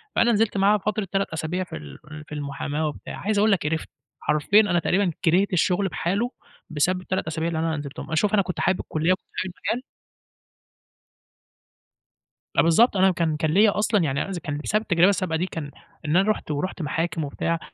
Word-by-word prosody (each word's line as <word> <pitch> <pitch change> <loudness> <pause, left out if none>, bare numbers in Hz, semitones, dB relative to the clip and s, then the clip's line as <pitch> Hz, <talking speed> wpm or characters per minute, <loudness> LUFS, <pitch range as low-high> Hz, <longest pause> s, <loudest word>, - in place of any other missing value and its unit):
فأنا 240 - +4
نزلت 215 -2 +1
معاه 200 +2 +4
فترة 210 0 -2
3 195 0 +1
أسابيع 160 +3 -2
في 180 - -9
ال 75 -3 -10
في - - -26
ال 155 -1 -8
في 150 - -7
المحاماة 145 +1 -3
وبتاع، 150 - -7
عايز 210 +1 -1
أقول 215 +1 +4
لَك 195 - +2
قرِفت، 160 +1 -2 0.3
حرفيًا 155 +8 +4
أنا 185 -5 +1
تقريبًا 185 +2 +1
كرِهت 185 +4 +3
الشُّغل 180 +3 +2
بحالُه، 200 +7 -1 0.4
بسبب 180 +5 +1
ال3 185 -2 -3
أسابيع 160 +1 -2
اللي 165 -1 -2
أنا 160 -1 0
نزِلتهم، 145 -1 -7
آآ، 155 - -1
شوف 205 +6 +1
أنا 210 - +5
كنت 180 -2 -4
حابب 190 0 +1
الكُلّيّة، 160 +3 0
وكنت 185 - -3
حابب 185 -1 -3 0.2
المجال 245 +3 -2 2.7
آه، - - +7
بالضبط 200 +7 +4
أنا 190 0 +5
كان 165 -3 0
كان 155 0 0
ليّا 205 +4 +4
أصلًا 210 -3 +2
يعني 140 -3 0
أنا - - -4
إذ 190 - -4
كان 145 -2 -4
بسبب 210 +8 0
التجربة 175 -3 +4
السابقة 185 -4 0
دي، 175 - 0
كان 160 -6 -6 0.3
إن 150 +2 0
أنا 195 +3 +4
رُحت 210 - -4
ورُحت 160 +5 -3
محاكم 160 +1 -2
وبتاع، 165 +3 -2
175 Hz, 205 wpm, -24 LUFS, 155-200 Hz, 2.7 s, آه